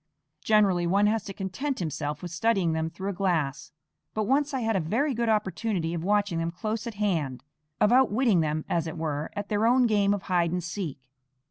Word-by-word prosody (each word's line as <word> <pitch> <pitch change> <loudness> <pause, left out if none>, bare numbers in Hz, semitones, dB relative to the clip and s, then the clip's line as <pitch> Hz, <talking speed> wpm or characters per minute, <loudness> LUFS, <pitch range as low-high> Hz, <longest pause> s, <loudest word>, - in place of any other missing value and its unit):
Generally 195 -5 +3
one 200 +4 +3
has 215 0 +1
to - - -5
content 200 +9 -3
himself 150 -3 -3
with 175 - -5
studying 185 -2 +1
them 160 0 -1
through 190 +4 -4
a - - -6
glass; 165 -9 -1 0.4
but 215 - +1
once 275 +6 +1
I 265 -2 -2
had 225 -1 0
a - - +3
very 235 - 0
good 235 -1 0
opportunity 195 -4 0
of 165 -1 -3
watching 205 -3 +1
them 165 0 -1
close 215 +6 -4
at 230 - -6
hand, 160 - -1 0.4
of 210 - +4
outwitting 245 -5 +4
them, 155 -1 -1
as 165 -1 0
it 160 - -6
were, 155 -1 -2
at 205 -1 -4
their 215 +1 +2
own 250 +1 +4
game 205 -3 +3
of 200 - -7
hide 175 -3 +1
and 180 0 -2
seek. 175 -4 -4
195 Hz, 210 wpm, -27 LUFS, 165-220 Hz, 0.4 s, of